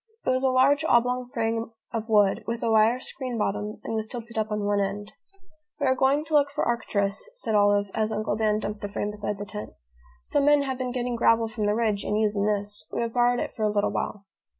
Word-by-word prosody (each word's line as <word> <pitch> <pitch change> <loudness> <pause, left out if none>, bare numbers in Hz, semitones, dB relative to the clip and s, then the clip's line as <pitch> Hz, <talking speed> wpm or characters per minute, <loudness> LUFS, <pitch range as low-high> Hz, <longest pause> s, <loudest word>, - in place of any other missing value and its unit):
It - - +3
was 255 0 +1
a 265 - +3
large 275 +4 +4
oblong 250 -2 +2
frame 230 -2 -2 0.2
of 225 0 -3
wood, 205 -3 +3
with 230 0 -3
a 230 - +1
wire 220 +2 +4
screen 255 -2 -5
bottom, 210 0 -2
and - - -4
was 220 -1 -2
tilted 235 -1 -8
up 220 -1 -1
on 210 -1 -1
one 205 0 +1
end. 200 +1 -3 0.7
"We 285 - 0
are 260 - +4
going 270 +3 +2
to 320 - -7
look 285 -1 +4
for 290 - -2
Arcturus," 210 - -1
said 225 - -3
Olive, 205 -1 +3
as 220 0 0
Uncle 215 -1 -1
Dan 215 -1 +1
dumped 210 -1 -4
the 205 - -3
frame 205 +1 -3
beside 210 0 -4
the 205 - -5
tent. 210 +1 -7 0.5
"Some 285 -1 +1
men 290 -1 +5
have 265 -2 -3
been 255 -1 -2
getting 245 -1 -2
gravel 230 -1 +3
from 215 -1 -2
the 210 - +2
ridge 215 -3 0
and 210 - -1
using 210 -1 +1
this. 205 0 -2
We - - -2
have 230 -1 -2
borrowed 245 0 +3
it - - -3
for - - -8
a 215 - +3
little 205 -1 +1
while." 200 -1 -4
225 Hz, 240 wpm, -26 LUFS, 210-250 Hz, 0.7 s, men